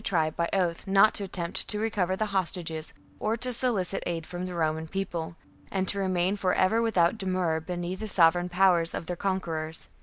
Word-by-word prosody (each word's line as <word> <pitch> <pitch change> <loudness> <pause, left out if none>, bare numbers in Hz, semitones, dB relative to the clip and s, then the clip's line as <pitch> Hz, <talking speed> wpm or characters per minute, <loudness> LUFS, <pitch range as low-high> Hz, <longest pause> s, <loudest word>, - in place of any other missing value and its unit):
tribe 160 -6 0
by 170 0 -1
oath 180 -3 -1
not 195 +2 +5
to 205 - -2
attempt 180 -3 -2
to 210 - +2
recover 210 -4 -1
the 215 - -1
hostages, 170 -4 -2 0.3
or 220 +2 -1
to 250 +1 0
solicit 215 -7 +3
aid 165 -2 -3
from 180 +2 -5
the 180 - -6
Roman 160 -1 -1
People, 170 -3 -4 0.3
and 190 -1 -2
to 200 - 0
remain 185 0 0
for 185 -2 0
ever 220 +5 +2
without 220 -3 +2
demur 185 -4 0
beneath 175 +2 -5
the 220 - -5
sovereign 175 -2 +3
power 180 -1 +4
of - - -5
their 180 - -4
conquerors. 165 -4 -3
180 Hz, 190 wpm, -27 LUFS, 170-195 Hz, 0.3 s, not